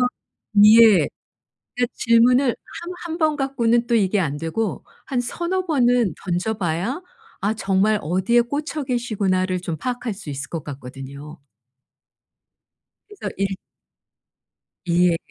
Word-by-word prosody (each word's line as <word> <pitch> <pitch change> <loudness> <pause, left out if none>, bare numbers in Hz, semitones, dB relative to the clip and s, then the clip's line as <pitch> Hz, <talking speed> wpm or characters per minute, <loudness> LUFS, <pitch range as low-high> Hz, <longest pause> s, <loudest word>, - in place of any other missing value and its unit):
한번 250 - +3 0.6
예. 220 -2 +7 0.7
그러니까 245 -1 0
질문을 245 +3 +4
한 345 +8 -8 0.2
1 335 - -4
번 310 -2 +2
갖고는 240 -4 +1
또 235 - +1
이게 205 -2 +2
안 145 -5 -1
되고 170 +6 -3 0.2
한 255 -3 -1
서너 345 +9 -2
번은 245 - +2
던져 185 +5 -1
봐야 195 - -2 0.4
'아 210 +3 0
정말 200 +1 +1
어디에 190 +9 +2
꽂혀 295 +4 -4
계시구나.'를 195 -7 0
좀 170 -3 -4
파악할 245 - -3
수 195 -7 -9
있을 140 0 -5
것 165 -4 -4
같거든요. 140 +2 -9 1.7
그래서 415 -2 -7
일 195 - +1 1.4
예. 175 0 +3
220 Hz, 235 characters per minute, -22 LUFS, 180-250 Hz, 1.7 s, 예